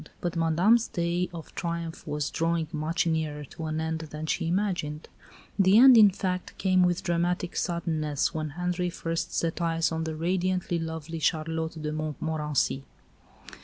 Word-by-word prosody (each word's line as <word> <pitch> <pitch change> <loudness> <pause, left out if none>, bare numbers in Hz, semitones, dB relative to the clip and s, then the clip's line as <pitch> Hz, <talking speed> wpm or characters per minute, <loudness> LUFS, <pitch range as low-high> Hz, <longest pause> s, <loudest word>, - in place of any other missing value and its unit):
But 175 0 -3
Madame's 175 +8 +3
day 175 +1 -1
of 165 -2 -9
triumph 170 -2 -4
was 150 -1 -2
drawing 165 -1 0
much 160 +2 -1
nearer 155 -3 -1
to 160 +4 -8
an 155 0 -2
end 160 0 -2
than 155 +1 -5
she 160 - -1
imagined. 175 -5 -1 0.5
The 195 +2 +6
end, 260 +1 +9
in 215 -3 +9
fact, 185 -1 -3
came 185 -1 +3
with 180 +1 +2
dramatic 175 0 0
suddenness 155 -4 -1
when 155 -1 -3
Henri 180 0 -1
first 165 -1 -3
set 165 +1 -1
eyes 165 -1 +1
on 160 0 -2
the 160 -1 -3
radiantly 180 +1 0
lovely 160 0 -5
Charlotte 160 0 -1
de 150 0 -3
Montmorency. 155 -2 -1
165 Hz, 155 wpm, -27 LUFS, 155-180 Hz, 0.5 s, end